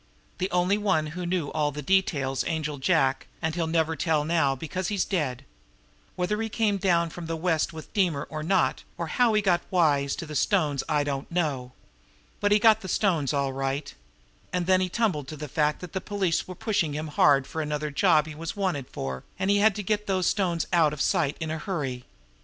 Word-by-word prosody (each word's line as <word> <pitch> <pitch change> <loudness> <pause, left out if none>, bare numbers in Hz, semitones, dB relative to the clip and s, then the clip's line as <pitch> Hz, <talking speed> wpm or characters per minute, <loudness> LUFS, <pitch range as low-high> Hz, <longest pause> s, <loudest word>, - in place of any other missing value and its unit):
"The 185 +1 0
only 180 +3 +2
one 185 -7 +1
who 180 0 -4
knew 175 -4 -1
all 150 -1 0
the 150 +1 -6
details 140 -7 +1
Angel 150 -3 -2
Jack, 135 -3 +2
and 160 -1 -1
he'll 165 -1 -1
never 160 0 +1
tell 155 0 +1
now 155 -4 +2
because 165 +6 -4
he's 205 -3 0
dead. 150 -10 -2 0.7
Whether 200 +4 -1
he 225 - -2
came 210 -2 +1
down 170 -4 +2
from 170 0 -7
the 165 - -2
West 165 -1 0
with 160 -2 -10
Deemer 175 -8 +1
or 155 -1 -4
not, 190 +5 +1 0.2
or - - -2
how 240 -4 +2
he 210 - +2
got 175 -3 +3
wise 145 -6 +2
to - - -6
the 155 - -8
stones, 150 -2 +1
I 150 -1 +2
don't 140 -1 -3
know. 140 -8 -1 0.7
But 205 0 +1
he 210 - +7
got 220 0 +5
the 190 - -7
stones, 170 -8 +1
all 140 -2 0
right. 135 +2 -3 0.6
And 180 -1 -1
then 185 +1 +4
he 185 - 0
tumbled 180 - 0
to 155 - -7
the 150 +1 -6
fact 150 +1 0
that 180 -2 -8
the 190 - -2
police 195 -5 -1
were 185 - -7
pushing 195 -7 0
him 155 +1 -4
hard 140 -2 +4
for 160 - -4
another 150 0 -2
job 155 -1 +4
he 160 - -7
was 160 +1 -6
'wanted' 185 -10 -2
for, 65 -1 -5
and 190 +1 +1
he 205 - +4
had 210 0 +4
to 210 - -4
get 210 +2 -1
those 190 -2 +1
stones 175 -5 +1
out 160 -4 +4
of 150 - -7
sight 145 0 +1
in 160 -1 -3
a 160 - -3
hurry. 135 -10 -3
165 Hz, 215 wpm, -26 LUFS, 150-190 Hz, 0.7 s, he